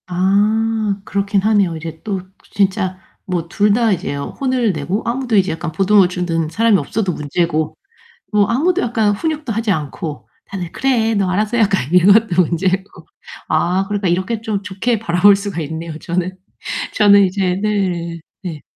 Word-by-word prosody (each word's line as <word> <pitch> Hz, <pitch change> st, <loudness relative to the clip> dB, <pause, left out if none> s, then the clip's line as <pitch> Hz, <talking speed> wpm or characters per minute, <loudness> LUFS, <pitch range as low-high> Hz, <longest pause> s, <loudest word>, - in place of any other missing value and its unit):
아 205 Hz, +3 st, +1 dB
그렇기는 200 Hz, 0 st, 0 dB
하네요. 200 Hz, -6 st, +2 dB
이제 160 Hz, 0 st, -8 dB
또 195 Hz, -3 st, -3 dB, 0.3 s
진짜 190 Hz, -2 st, 0 dB, 0.3 s
뭐 175 Hz, -3 st, -2 dB
2 205 Hz, +3 st, +2 dB
다 230 Hz, 0 st, +2 dB
이제 185 Hz, -5 st, -2 dB
혼을 245 Hz, -, -1 dB
내고 175 Hz, +8 st, -2 dB
아무도 240 Hz, -1 st, -1 dB
이제 190 Hz, 0 st, +3 dB
약간 165 Hz, +1 st, -4 dB
보듬어 195 Hz, +1 st, +4 dB
주는 170 Hz, -3 st, -2 dB
사람이 225 Hz, +4 st, +3 dB
없어도 185 Hz, +4 st, -2 dB
문제고 155 Hz, +1 st, -1 dB, 0.5 s
뭐 210 Hz, -1 st, +4 dB
아무도 345 Hz, -, +1 dB
약간 225 Hz, -3 st, +1 dB
훈육도 305 Hz, +1 st, -3 dB
하지 225 Hz, 0 st, 0 dB
않고 155 Hz, -1 st, -4 dB, 0.2 s
다들 180 Hz, -4 st, -6 dB
"그래 235 Hz, -4 st, +1 dB
너 195 Hz, -2 st, +1 dB
알아서 210 Hz, +5 st, 0 dB
해." -, -, +3 dB
약간 190 Hz, -8 st, 0 dB
이것도 185 Hz, +1 st, +5 dB
문제고 185 Hz, +3 st, -2 dB, 0.4 s
아 185 Hz, +2 st, +1 dB
그러니까 205 Hz, -1 st, -1 dB
이렇게 190 Hz, +6 st, -1 dB
좀 215 Hz, -3 st, -2 dB
좋게 205 Hz, +4 st, -1 dB
바라볼 200 Hz, -1 st, +4 dB
수가 195 Hz, -4 st, -4 dB
있네요. 160 Hz, +1 st, -5 dB
저는 180 Hz, +2 st, -3 dB, 0.6 s
저는 200 Hz, -1 st, +6 dB
이제 185 Hz, -1 st, -1 dB
네, 180 Hz, -5 st, -1 dB, 0.2 s
네. 165 Hz, -6 st, -6 dB
195 Hz, 315 characters per minute, -18 LUFS, 175-215 Hz, 0.6 s, 저는